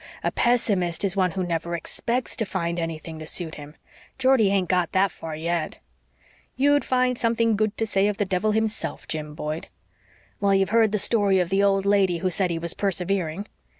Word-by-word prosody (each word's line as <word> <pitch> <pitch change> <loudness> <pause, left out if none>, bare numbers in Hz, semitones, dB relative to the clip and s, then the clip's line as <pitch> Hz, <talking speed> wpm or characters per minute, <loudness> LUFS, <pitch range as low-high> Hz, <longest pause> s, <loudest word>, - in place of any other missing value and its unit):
A - - +1
pessimist 200 -8 +1
is 195 -1 +1
one 185 -2 +2
who 185 +1 -3
never 170 0 -2
expects 235 +9 -3
to 225 - 0
find 175 -4 -2
anything 165 -1 -5
to 155 - -8
suit 165 -2 -4
him. 145 +1 -10 0.4
Geordie 260 -5 +4
hain't 195 -2 +1
got 180 -2 +1
THAT 190 0 +3
far 160 -1 -7
yet." 165 0 -2 0.8
"You'd 285 +2 +3
find 250 -1 +1
something 230 -1 +2
good 215 0 0
to 225 - 0
say 200 -2 +1
of 210 -1 -1
the 205 - 0
devil 190 +3 0
himself, 220 0 -2
Jim 150 -1 -4
Boyd." 155 +1 -4 0.7
"Well, 200 -1 +3
you've 195 0 +2
heard 225 -2 +4
the 210 - +1
story 200 -2 +2
of 180 -2 0
the 195 +1 +3
old 195 -1 +2
lady 195 -3 +3
who 185 +2 -1
said 180 +2 +1
he 170 - -1
was 170 0 -2
persevering. 190 -2 -1
195 Hz, 195 wpm, -24 LUFS, 170-215 Hz, 0.8 s, Geordie